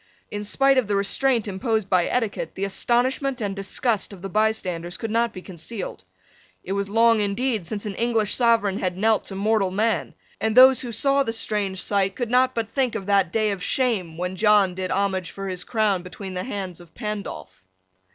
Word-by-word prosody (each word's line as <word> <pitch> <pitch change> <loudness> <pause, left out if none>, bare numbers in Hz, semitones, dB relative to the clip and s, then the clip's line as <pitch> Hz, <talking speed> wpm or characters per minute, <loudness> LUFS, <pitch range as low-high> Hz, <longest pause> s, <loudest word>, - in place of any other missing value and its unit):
In 205 0 -4
spite 270 +5 +3
of 240 - -2
the 205 - 0
restraint 225 +4 +1
imposed 210 +1 -1
by 180 -2 +2
etiquette, 205 -9 -2
the 195 - -2
astonishment 255 +6 0
and 200 -3 -2
disgust 205 +3 -1
of 185 -2 -12
the 195 - -4
bystanders 185 -5 -1
could 225 - -4
not 230 0 +1
be 185 - -10
concealed. 180 - -7 0.6
It 190 - -6
was 200 0 -1
long 230 +1 +4
indeed 205 -1 -1
since 210 +2 -4
an 205 - -3
English 225 -2 +1
sovereign 230 -5 +2
had 180 -1 -2
knelt 220 +2 +2
to 195 - -7
mortal 205 0 +1
man; 215 +4 -1 0.2
and 220 +1 -1
those 260 0 +8
who 245 - -5
saw 275 +5 +2
the 225 -4 -1
strange 205 -4 -1
sight 195 -1 +1
could 240 -2 -3
not 255 +1 +3
but 225 -2 -2
think 260 -4 0
of 195 - -4
that 195 -3 +2
day 215 0 +1
of 195 -2 -4
shame 190 -7 0
when 180 +1 -3
John 210 -2 +4
did 185 0 -4
homage 190 -2 0
for 195 0 -6
his 185 -2 -3
crown 215 -5 +1
between 185 +1 -8
the 180 0 -4
hands 195 -8 -5
of 175 -2 -17
Pandolph. 200 - -6
205 Hz, 200 wpm, -23 LUFS, 190-230 Hz, 0.6 s, those